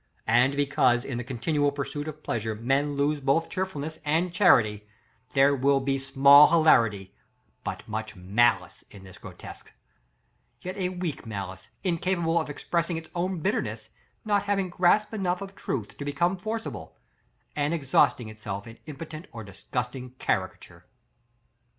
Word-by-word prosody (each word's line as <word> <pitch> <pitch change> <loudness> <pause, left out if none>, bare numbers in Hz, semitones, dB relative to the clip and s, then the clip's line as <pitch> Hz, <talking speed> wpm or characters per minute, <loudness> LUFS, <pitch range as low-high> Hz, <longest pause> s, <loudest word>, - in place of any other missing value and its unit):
And 125 +5 +3
because, 135 -4 +2
in 125 -3 -4
the - - -4
continual 145 +4 0
pursuit 145 +1 -5
of 155 0 -8
pleasure, 110 -1 -2
men 135 +6 0
lose 145 +1 0
both 140 +5 +1
cheerfulness 160 -4 -4
and 165 +4 0
charity, 110 - +4 0.5
there 140 +1 +4
will 140 +1 +3
be 135 0 -1
small 140 +2 +7
hilarity, 115 - +3 0.5
but - - -6
much 110 0 -5
malice, 100 +6 +1
in 100 -2 -13
this 95 -1 -13
grotesque; - - -11 0.9
yet 185 +1 -5
a 185 -3 -1
weak 175 -9 -5
malice, 95 -3 -6
incapable 170 -2 +1
of 160 - -6
expressing 170 +3 -2
its 160 0 -9
own 180 0 -2
bitterness, 200 +7 -2 0.4
not 205 -2 +2
having 195 -3 0
grasp 205 +5 +2
enough 185 -4 -1
of 195 0 -8
truth 110 -6 -4
to - - -4
become 145 +6 0
forcible, 220 +4 -6 0.6
and 145 0 0
exhausting 135 -6 +2
itself 105 -2 -6
in 115 0 -12
impotent 155 +2 -8
or 115 -2 -8
disgusting 125 +5 -5
caricature. - - -3
145 Hz, 145 wpm, -27 LUFS, 120-170 Hz, 0.9 s, small